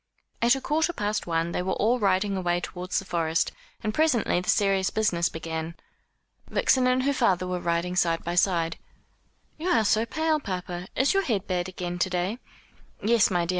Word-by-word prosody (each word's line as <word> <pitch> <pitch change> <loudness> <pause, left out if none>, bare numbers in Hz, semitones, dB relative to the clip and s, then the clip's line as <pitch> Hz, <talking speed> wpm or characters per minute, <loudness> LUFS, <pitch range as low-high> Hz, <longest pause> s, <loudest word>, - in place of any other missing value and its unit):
At 240 +3 +5
a 270 - -5
quarter 320 +5 0
past 210 - -2
one 165 0 0
they 180 - -1
were 185 +1 -1
all 240 +4 +2
riding 195 -1 +1
away 175 -2 0
towards 180 +1 -4
the 195 - -2
Forest, 165 -3 0 0.3
and 215 -1 -1
presently 250 - +2
the 180 - -5
serious 195 -1 +2
business 175 -6 +1
began. 160 0 -5 0.7
Vixen 255 -1 +3
and 255 0 +2
her 280 +1 +2
father 190 -9 +2
were 180 0 -2
riding 170 +1 -1
side 170 -2 +1
by 170 - -3
side. 170 -2 +1 0.8
"You 335 - -3
are 225 -9 +3
so 220 +3 +2
pale, 315 +3 0
papa. 180 -6 -5
Is 265 +8 +3
your 390 - +3
head 210 - -1
bad 180 -1 -2
again 175 -1 -5
to 185 - +1
day?" 180 +6 -2 0.6
"Yes, 225 0 +4
my 175 -3 +1
dear. - - -10
185 Hz, 190 wpm, -26 LUFS, 175-230 Hz, 0.8 s, At